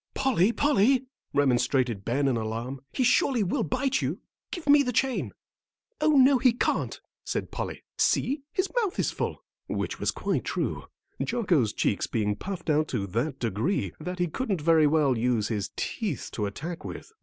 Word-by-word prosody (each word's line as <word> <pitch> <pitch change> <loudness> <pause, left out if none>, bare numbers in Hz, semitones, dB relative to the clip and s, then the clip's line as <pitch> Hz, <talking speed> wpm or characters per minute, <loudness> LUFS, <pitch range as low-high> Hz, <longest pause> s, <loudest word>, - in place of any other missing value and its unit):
"Polly, 230 -6 +3
Polly," 265 0 +3 0.3
remonstrated 125 -5 +2
Ben 135 +6 +1
in 130 - +2
alarm, 115 +4 -4
"he 260 - 0
surely 250 -1 +3
will 185 - 0
bite 265 - 0
you; - - -2 0.3
give 345 -4 -6
me 290 0 +7
the 250 -3 0
chain." 260 +2 0 0.7
"Oh, 310 0 +4
no, 270 -1 +6
he 250 -2 +4
can't," 245 - -1 0.2
said - - -3
Polly. - - -5 0.2
"See, 280 +2 +2
his 375 0 0
mouth 415 -3 -2
is - - +1
full," - - -4 0.2
which - - -3
was - - 0
quite - - -1
true, - - -2 0.4
Jocko's 185 - +1
cheeks 100 - 0
being 105 -2 0
puffed 180 - -4
out 155 +1 +2
to 110 -6 -2
that 120 - -2
degree 110 - -1
that 180 0 -5
he 175 - +1
couldn't 195 +2 -2
very 160 -1 +5
well 145 -3 +3
use 115 -2 +1
his 105 -4 -2
teeth 200 - -3
to 105 -2 -2
attack 160 - -6
with. - - -8
160 Hz, 170 wpm, -27 LUFS, -, 0.7 s, me